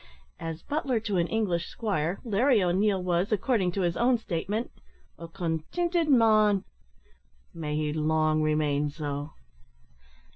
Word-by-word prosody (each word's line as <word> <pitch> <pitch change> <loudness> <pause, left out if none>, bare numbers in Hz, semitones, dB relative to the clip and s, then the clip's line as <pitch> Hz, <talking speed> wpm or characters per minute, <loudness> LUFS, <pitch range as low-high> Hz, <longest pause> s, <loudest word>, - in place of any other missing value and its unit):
As 165 0 -6
butler 275 -5 -1
to 210 -3 -1
an 170 -1 +1
English 180 -6 -1
squire, 195 -6 -2
Larry 230 0 +3
O'Neil 190 +2 +1
was, 180 +3 0
according 215 -3 +1
to 195 - -1
his 175 -2 0
own 245 +1 +3
statement, 210 +2 -3 0.5
"a 165 - -7
continted 195 - -1
man." 215 -6 +4 0.9
May 150 -3 -4
he 150 -1 -1
long 155 0 +1
remain 150 -1 +1
so! 145 0 -5
180 Hz, 125 wpm, -27 LUFS, 160-220 Hz, 0.9 s, man